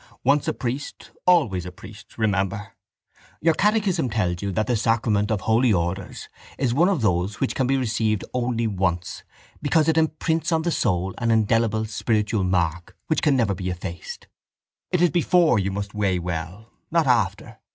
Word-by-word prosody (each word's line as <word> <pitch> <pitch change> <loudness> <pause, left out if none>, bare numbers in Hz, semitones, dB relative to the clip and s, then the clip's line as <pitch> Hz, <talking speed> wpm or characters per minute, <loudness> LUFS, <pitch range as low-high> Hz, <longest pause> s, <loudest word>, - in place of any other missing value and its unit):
Once 140 +3 +2
a - - +1
priest 130 +3 -5 0.2
always 120 - +3
a 90 - -7
priest, 100 +4 -14
remember. 100 -1 -1 0.7
Your 165 +1 +3
catechism 205 - +1
tells 90 -6 -1
you 100 -1 -2
that 110 +4 0
the 120 - 0
sacrament 110 -2 +1
of 110 -4 0
Holy 115 +3 +3
Orders 90 0 -2 0.3
is 130 -3 0
one 170 +8 +4
of 175 - 0
those 95 +1 0
which 135 - 0
can 130 - 0
be 135 +1 +2
received 110 -4 0
only 120 -2 -1
once 90 -4 -2 0.4
because 155 +1 +2
it 160 0 +3
imprints 160 +1 0
on 160 -1 +1
the 170 - 0
soul 95 - 0
an 115 - 0
indelible 110 0 +2
spiritual 110 -1 0
mark 85 -2 -1
which 155 - 0
can 150 -3 +3
never 115 -6 +2
be 90 0 -4
effaced. 90 -1 -7 0.6
It 180 -1 +1
is 175 - +4
before 170 - +3
you 95 0 -1
must 100 +1 -5
weigh 100 -3 0
well, 90 +5 -5 0.2
not 165 -1 +2
after. 110 -2 0
110 Hz, 170 wpm, -23 LUFS, 95-135 Hz, 0.7 s, one